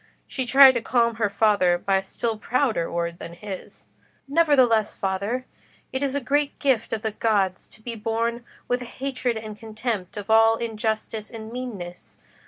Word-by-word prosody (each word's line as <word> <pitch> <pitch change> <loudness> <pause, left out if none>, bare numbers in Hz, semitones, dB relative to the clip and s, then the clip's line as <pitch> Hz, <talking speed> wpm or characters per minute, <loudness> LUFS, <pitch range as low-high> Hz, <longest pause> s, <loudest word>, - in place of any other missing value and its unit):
She 260 -2 -4
tried 270 +2 +9
to 240 -2 -2
calm 235 -1 +1
her 215 -3 +1
father 200 -4 +3
by 195 +2 +1
a - - 0
still 225 +4 -3
prouder 225 -4 0
word 170 0 -2
than 170 - -8
his. 195 +1 -9 0.4
"Nevertheless, 270 -8 +3
father, 200 +7 -2 0.5
it 260 - -2
is 280 -1 -1
a - - +2
great 285 +2 0
gift 265 -6 +1
of 220 0 -3
the 220 - -1
gods 205 -4 0
to 215 - -15
be 235 - -5
born 230 +2 -2 0.2
with 245 0 0
a - - -6
hatred 255 -2 -3
and 215 -1 -8
contempt 220 -4 -4
of 205 +1 -4
all 225 0 +6
injustice 220 -1 -3
and 220 -1 -8
meanness. 215 -9 -7
225 Hz, 175 wpm, -24 LUFS, 205-250 Hz, 0.5 s, tried